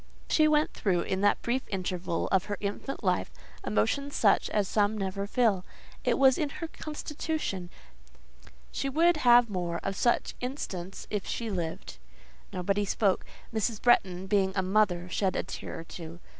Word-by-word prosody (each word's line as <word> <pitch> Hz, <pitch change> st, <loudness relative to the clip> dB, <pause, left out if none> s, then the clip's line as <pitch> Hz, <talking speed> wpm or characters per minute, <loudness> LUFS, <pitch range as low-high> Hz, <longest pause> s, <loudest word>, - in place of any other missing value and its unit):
She 310 Hz, -1 st, +4 dB
went 305 Hz, 0 st, +2 dB
through, 180 Hz, -4 st, +1 dB
in 190 Hz, 0 st, -2 dB
that 205 Hz, -, +3 dB
brief 250 Hz, +3 st, 0 dB
interval 180 Hz, -3 st, -2 dB
of 190 Hz, -2 st, +2 dB
her 205 Hz, -1 st, -3 dB
infant 205 Hz, +7 st, -4 dB
life, -, -, +1 dB, 0.3 s
emotions 280 Hz, 0 st, 0 dB
such 205 Hz, -, +3 dB
as 205 Hz, -2 st, +1 dB
some 210 Hz, +1 st, +1 dB
never 195 Hz, 0 st, -2 dB
feel; 210 Hz, -5 st, +2 dB, 0.4 s
it -, -, +2 dB
was 265 Hz, -1 st, +5 dB
in 300 Hz, -, 0 dB
her 330 Hz, +3 st, -6 dB
constitution: 300 Hz, -, -4 dB, 1.0 s
she 275 Hz, -, -2 dB
would 330 Hz, +4 st, +4 dB
have 245 Hz, -4 st, +6 dB
more 175 Hz, -4 st, -2 dB
of 195 Hz, -, -2 dB
such 240 Hz, +4 st, +1 dB
instants 195 Hz, -8 st, -5 dB
if 205 Hz, -2 st, -2 dB
she 230 Hz, -2 st, -3 dB
lived. 160 Hz, -, -4 dB, 0.5 s
Nobody 195 Hz, +3 st, 0 dB
spoke. 200 Hz, -1 st, +1 dB, 0.3 s
Mrs. 220 Hz, 0 st, 0 dB
Bretton, 190 Hz, -6 st, +3 dB
being 190 Hz, -1 st, +2 dB
a 190 Hz, -, +1 dB
mother, 185 Hz, -2 st, +2 dB
shed 185 Hz, +1 st, 0 dB
a -, -, 0 dB
tear -, -, -6 dB
or -, -, -9 dB
two. 165 Hz, 0 st, -9 dB
205 Hz, 160 wpm, -29 LUFS, 185-245 Hz, 1.0 s, have